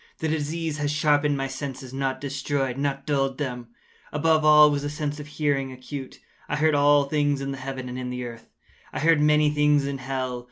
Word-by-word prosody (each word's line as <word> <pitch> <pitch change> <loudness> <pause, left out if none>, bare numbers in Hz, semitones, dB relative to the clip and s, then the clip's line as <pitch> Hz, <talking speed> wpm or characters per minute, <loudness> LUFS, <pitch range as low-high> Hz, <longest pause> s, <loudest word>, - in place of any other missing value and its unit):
The 160 - -2
disease 155 0 -2
had 145 0 0
sharpened 150 -1 +2
my 135 - -1
senses—not 135 -1 -4
destroyed—not 140 0 -2
dulled 135 -3 0
them. 125 -5 -4 0.4
Above 155 +1 +2
all 150 0 +7
was 145 -1 -1
the 145 - -3
sense 150 0 -4
of 150 - -8
hearing 145 -3 -1
acute. 130 +1 -8 0.3
I 150 - 0
heard 155 +1 +2
all 145 0 +5
things 145 0 0
in 135 0 -3
the 135 - -6
heaven 130 -1 -5
and 125 +1 -5
in 125 -1 -4
the 125 0 -4
earth. 115 -1 -10 0.4
I - - -4
heard 160 0 +4
many 150 0 +4
things 150 -1 +3
in 140 -1 -3
hell. 130 -1 -3
145 Hz, 195 wpm, -25 LUFS, 135-150 Hz, 0.4 s, all